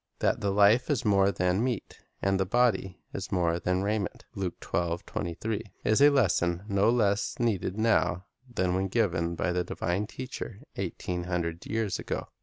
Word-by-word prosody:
That -, -, +1 dB
"the 100 Hz, -, +1 dB
life 105 Hz, +6 st, +4 dB
is 140 Hz, -7 st, 0 dB
more 100 Hz, -1 st, +4 dB
than 90 Hz, +3 st, +1 dB
meat, 125 Hz, -4 st, -3 dB, 0.2 s
and 95 Hz, 0 st, +2 dB
the -, -, +3 dB
body 115 Hz, -4 st, +2 dB, 0.2 s
is -, -, -5 dB
more 85 Hz, -2 st, +1 dB
than 90 Hz, +2 st, 0 dB
raiment," 105 Hz, 0 st, -2 dB
1 95 Hz, -3 st, -2 dB, 1.3 s
is 110 Hz, +5 st, +3 dB
a 145 Hz, -, +9 dB
lesson 90 Hz, -9 st, +2 dB
no 100 Hz, +1 st, +3 dB
less 105 Hz, -4 st, +1 dB
needed 105 Hz, -4 st, 0 dB
now 110 Hz, -5 st, +2 dB, 0.3 s
than 90 Hz, -5 st, 0 dB
when 95 Hz, +1 st, 0 dB
given 85 Hz, -5 st, 0 dB
by 90 Hz, -, 0 dB
the 90 Hz, 0 st, 0 dB
divine 90 Hz, +4 st, -2 dB
Teacher 125 Hz, -3 st, -7 dB
eighteen 90 Hz, -1 st, -3 dB
hundred 85 Hz, -2 st, -3 dB
years 110 Hz, -3 st, -1 dB
ago. -, -, -4 dB
100 Hz, 160 wpm, -28 LUFS, 90-110 Hz, 1.3 s, a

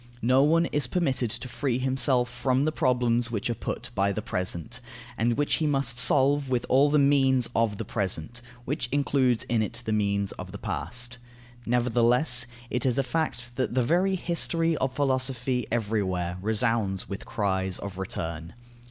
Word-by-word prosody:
No 130 Hz, +3 st, +4 dB
one 165 Hz, +4 st, +4 dB
is 145 Hz, -5 st, -1 dB
permitted 135 Hz, -7 st, 0 dB
to 120 Hz, +4 st, -5 dB
free 120 Hz, +1 st, -1 dB
himself 130 Hz, -1 st, +2 dB
from 125 Hz, +2 st, 0 dB
the 155 Hz, -, +1 dB
problems 120 Hz, -4 st, +2 dB
which 115 Hz, 0 st, -2 dB
are -, -, +1 dB
put 115 Hz, -, -5 dB
by 100 Hz, -2 st, +1 dB
the 100 Hz, +2 st, -4 dB
present, 90 Hz, -6 st, -3 dB, 0.3 s
and 115 Hz, +1 st, 0 dB
which 145 Hz, -, +1 dB
he 155 Hz, -, 0 dB
must 135 Hz, -4 st, 0 dB
solve 140 Hz, +1 st, +3 dB
with 125 Hz, -2 st, 0 dB
all 140 Hz, +3 st, +5 dB
the 150 Hz, -, +3 dB
means 135 Hz, -3 st, +4 dB
of 110 Hz, -3 st, +1 dB
the -, -, -4 dB
present 100 Hz, +2 st, -2 dB, 0.2 s
(which 145 Hz, -3 st, -3 dB
includes 135 Hz, -4 st, +2 dB
in 115 Hz, -1 st, 0 dB
it 115 Hz, +2 st, -4 dB
the 110 Hz, -, -1 dB
means 100 Hz, -1 st, 0 dB
of -, -, -9 dB
the -, -, -5 dB
past). 125 Hz, 0 st, -5 dB, 0.5 s
Nevertheless, 120 Hz, +2 st, +2 dB, 0.2 s
it 125 Hz, -, -1 dB
is 130 Hz, -1 st, +1 dB
a 135 Hz, -, +2 dB
fact 125 Hz, -3 st, -2 dB
that 130 Hz, -1 st, -1 dB
the 170 Hz, +10 st, +2 dB
history 165 Hz, -2 st, 0 dB
of 130 Hz, 0 st, 0 dB
philosophy 130 Hz, -2 st, 0 dB
everywhere 95 Hz, -6 st, -1 dB
resounds 110 Hz, -2 st, 0 dB
with 100 Hz, 0 st, -7 dB
cries 95 Hz, -3 st, -1 dB
of 100 Hz, -2 st, -7 dB
return. 85 Hz, -3 st, -5 dB
125 Hz, 170 wpm, -27 LUFS, 110-135 Hz, 0.5 s, all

